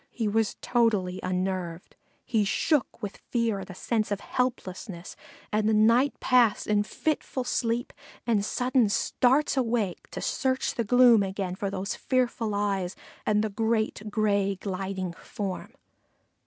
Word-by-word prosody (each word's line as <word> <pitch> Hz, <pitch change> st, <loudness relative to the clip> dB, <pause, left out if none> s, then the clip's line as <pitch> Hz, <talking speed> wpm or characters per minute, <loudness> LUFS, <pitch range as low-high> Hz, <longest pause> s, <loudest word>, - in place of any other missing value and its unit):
He 225 Hz, -3 st, -2 dB
was 220 Hz, +1 st, +1 dB
totally 210 Hz, -7 st, +1 dB
unnerved. 185 Hz, -2 st, -3 dB, 0.3 s
He 220 Hz, -3 st, +2 dB
shook 245 Hz, +3 st, 0 dB
with 205 Hz, -, -5 dB
fear 230 Hz, -4 st, 0 dB
and 195 Hz, -, -8 dB
a 185 Hz, -, -8 dB
sense 215 Hz, +2 st, -1 dB
of 205 Hz, -1 st, -1 dB
helplessness, 195 Hz, -7 st, -3 dB, 0.4 s
and 215 Hz, 0 st, +2 dB
the 220 Hz, -, +3 dB
night 230 Hz, +6 st, +4 dB
passed 245 Hz, -5 st, +3 dB
in 210 Hz, -1 st, +2 dB
fitful 265 Hz, +3 st, -2 dB
sleep 235 Hz, 0 st, -1 dB, 0.3 s
and 220 Hz, -4 st, +2 dB
sudden 250 Hz, +1 st, +2 dB
starts 260 Hz, +8 st, +2 dB
awake 230 Hz, -7 st, -1 dB
to -, -, -6 dB
search 260 Hz, -1 st, 0 dB
the 235 Hz, -, -1 dB
gloom 240 Hz, 0 st, +6 dB
again 190 Hz, -1 st, -2 dB
for 195 Hz, +1 st, -3 dB
those 195 Hz, 0 st, -3 dB
fearful 240 Hz, -4 st, 0 dB
eyes 195 Hz, -3 st, -1 dB, 0.3 s
and 210 Hz, 0 st, +3 dB
the 220 Hz, -, -1 dB
great 220 Hz, 0 st, -1 dB
gray 200 Hz, -2 st, +1 dB
gliding 190 Hz, -1 st, -4 dB
form. 195 Hz, +2 st, -6 dB
215 Hz, 140 wpm, -27 LUFS, 195-235 Hz, 0.4 s, gloom